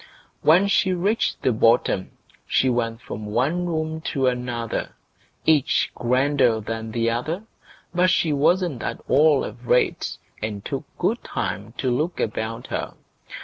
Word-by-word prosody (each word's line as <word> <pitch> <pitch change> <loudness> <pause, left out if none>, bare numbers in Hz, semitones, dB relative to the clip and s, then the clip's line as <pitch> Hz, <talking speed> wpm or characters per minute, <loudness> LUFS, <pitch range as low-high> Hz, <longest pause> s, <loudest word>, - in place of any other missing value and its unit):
When 175 +6 +5
she 190 -1 +2
reached 200 +6 0
the 130 - +3
bottom 115 -4 +2 0.3
she 130 - +3
went 115 -1 -1
from 105 -2 -7
one 140 +12 0
room 160 -1 -2
to 135 -2 0
another, 125 -2 -2 0.5
each 155 -2 +3
grander 125 -1 +2
than 110 +1 -5
the 115 +1 0
other; 155 - -2 0.5
but 180 +1 +3
she 165 -3 +2
wasn't 155 -1 +2
at - - -3
all 150 -1 +4
afraid, 125 +1 +1 0.4
and 105 -2 -4
took - - -4
good - - 0
time 105 +4 -4
to 130 - 0
look 165 +6 -1
about 110 +1 -3
her. - - -3
130 Hz, 140 wpm, -23 LUFS, 115-160 Hz, 0.5 s, When